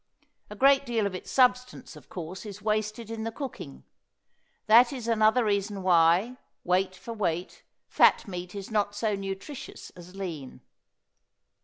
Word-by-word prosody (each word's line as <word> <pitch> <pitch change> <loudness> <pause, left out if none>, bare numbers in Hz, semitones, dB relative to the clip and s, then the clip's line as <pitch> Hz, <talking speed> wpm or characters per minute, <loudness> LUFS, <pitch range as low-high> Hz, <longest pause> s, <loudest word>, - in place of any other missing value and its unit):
A 210 - -8
great 275 +4 +4
deal 235 -5 -1
of 200 - -2
its 185 - -8
substance, 250 -1 +1
of - - -15
course, 180 +3 -7
is 205 -2 -9
wasted 215 +1 -2
in 225 -1 -5
the 225 - -3
cooking. 220 - -8 0.8
That 235 +3 +6
is 250 -4 -6
another 225 +1 +3
reason 200 -1 -1
why, 180 +7 +3 0.3
weight 185 +1 +1
for 190 +6 -8
weight, 180 -5 -3 0.3
fat - - +4
meat 180 0 -7
is 200 +1 -7
not 205 -1 0
so 210 0 -1
nutritious 195 +7 -7
as 180 +1 -14
lean. 165 -9 -7
205 Hz, 150 wpm, -27 LUFS, 185-230 Hz, 0.8 s, That